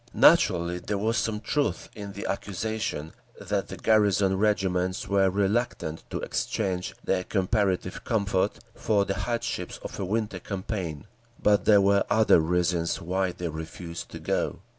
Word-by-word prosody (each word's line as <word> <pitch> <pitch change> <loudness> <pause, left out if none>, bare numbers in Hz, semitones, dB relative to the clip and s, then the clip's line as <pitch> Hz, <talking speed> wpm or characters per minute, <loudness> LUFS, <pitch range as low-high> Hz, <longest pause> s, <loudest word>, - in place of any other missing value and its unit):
Naturally 85 +1 +5
there 100 +3 -2
was 110 +3 0
some 110 -2 0
truth 145 +6 -1
in 100 -2 -7
the 100 - -6
accusation 100 -5 -3 0.3
that - - -2
the - - -7
garrison 100 -3 +3
regiments 95 -3 0
were 100 -1 +3
reluctant 100 -4 -1
to - - -3
exchange 95 -4 -2
their 90 -1 0
comparative 95 -1 0
comfort 100 -3 0 0.2
for 100 -3 +1
the 95 - -1
hardships 115 +4 -3
of - - -7
a - - -1
winter 110 +3 -1
campaign. 95 -6 -4 0.3
But 105 0 +3
there 105 -2 +6
were 100 0 +4
other 110 -5 +5
reasons 85 0 +1
why 95 +2 -1
they 85 -1 -4
refused 80 +2 -7
to - - -8
go. - - -1
95 Hz, 145 wpm, -27 LUFS, 90-105 Hz, 0.3 s, there